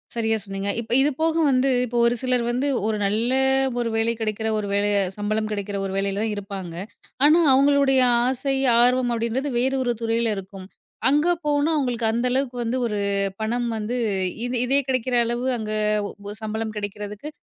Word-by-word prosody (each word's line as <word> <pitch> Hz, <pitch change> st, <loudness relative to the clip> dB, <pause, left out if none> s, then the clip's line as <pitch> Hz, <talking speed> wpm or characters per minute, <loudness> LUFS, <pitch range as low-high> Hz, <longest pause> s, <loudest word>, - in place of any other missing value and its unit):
சரியா 225 Hz, -1 st, 0 dB
சொன்னீங்க. 195 Hz, 0 st, -4 dB
இப்ப 230 Hz, -, -11 dB
இது 285 Hz, -, +3 dB
போக 325 Hz, 0 st, +2 dB
வந்து, 265 Hz, 0 st, +2 dB, 0.2 s
இப்போ 240 Hz, 0 st, -4 dB
ஒரு 235 Hz, +1 st, +2 dB
சிலர் 250 Hz, -2 st, +1 dB
வந்து 255 Hz, +4 st, -1 dB, 0.2 s
ஒரு 220 Hz, -1 st, 0 dB
நல்ல 215 Hz, +5 st, 0 dB, 0.5 s
ஒரு 235 Hz, -1 st, -1 dB
வேலை 225 Hz, +1 st, +1 dB
கிடைக்கிற 220 Hz, 0 st, -2 dB
ஒரு 210 Hz, -1 st, -3 dB
வேல 200 Hz, +1 st, +2 dB, 0.3 s
சம்பளம் 215 Hz, +1 st, -1 dB
கிடைக்கிற 200 Hz, -1 st, -3 dB
ஒரு 195 Hz, -, -4 dB
வேலையில் 195 Hz, +1 st, -1 dB
தான் 220 Hz, -, -1 dB
இருப்பாங்க. 195 Hz, -4 st, -7 dB, 0.5 s
ஆனா 310 Hz, +3 st, +6 dB
அவங்களுடைய 275 Hz, 0 st, +4 dB, 0.3 s
ஆசை, 265 Hz, +1 st, -1 dB, 0.3 s
ஆர்வம் 250 Hz, 0 st, +3 dB
அப்டின்றது 235 Hz, +5 st, -2 dB
வேறு 265 Hz, +2 st, +1 dB
ஒரு 245 Hz, -1 st, 0 dB
துறையில 230 Hz, -1 st, 0 dB
இருக்கும். 190 Hz, 0 st, -9 dB, 0.4 s
அங்க 295 Hz, +4 st, +2 dB, 0.2 s
போனா, 290 Hz, +1 st, +1 dB
அவங்களுக்கு 245 Hz, -5 st, 0 dB
அந்த 235 Hz, +2 st, 0 dB
அளவுக்கு 255 Hz, -1 st, -1 dB
வந்து 235 Hz, +2 st, -1 dB
ஒரு 210 Hz, -2 st, -3 dB, 0.4 s
பணம் 240 Hz, +2 st, -1 dB
வந்து, 215 Hz, +3 st, -3 dB, 0.5 s
இது 245 Hz, +1 st, -3 dB
இதே 270 Hz, +3 st, +3 dB
கிடைக்கிற 255 Hz, -1 st, 0 dB
அளவு 240 Hz, +2 st, -2 dB
அங்க 215 Hz, -1 st, -4 dB, 0.6 s
ஒ -, -, -5 dB
சம்பளம் 220 Hz, 0 st, -4 dB
கிடைக்கிறதுக்கு 205 Hz, +4 st, -6 dB
230 Hz, 170 wpm, -23 LUFS, 210-255 Hz, 0.6 s, ஆனா